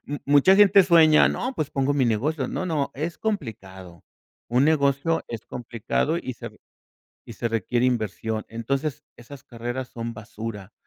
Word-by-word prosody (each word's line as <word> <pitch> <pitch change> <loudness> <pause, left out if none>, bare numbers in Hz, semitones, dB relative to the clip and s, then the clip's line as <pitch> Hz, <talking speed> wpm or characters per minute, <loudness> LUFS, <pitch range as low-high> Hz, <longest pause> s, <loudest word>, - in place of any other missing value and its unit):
M 145 0 -5
mucha 145 +7 +5
gente 200 -1 +7
sueña, 165 -4 +6
no, 255 +2 -3
pues, 155 - -3
pongo 135 +1 0
mi 135 -3 +2
negocio. 130 +5 -1
No, - - -3
no, 155 -5 -1
es 155 +3 -4
complicado. 95 - -5 0.5
Un 125 +3 +3
negocio 150 +1 +1
es 115 -2 -7
complicado 120 +6 -2
y 130 - -5
se - - -9
r - - -11 0.7
y - - -8
se 115 - -2
requiere 115 +3 0
inversión. 110 -2 -2
Entonces, 140 +6 -3
esas 130 +3 -12
carreras 120 0 -5
son 115 0 -6
basura. 105 -1 -8
130 Hz, 160 wpm, -24 LUFS, 115-155 Hz, 0.7 s, gente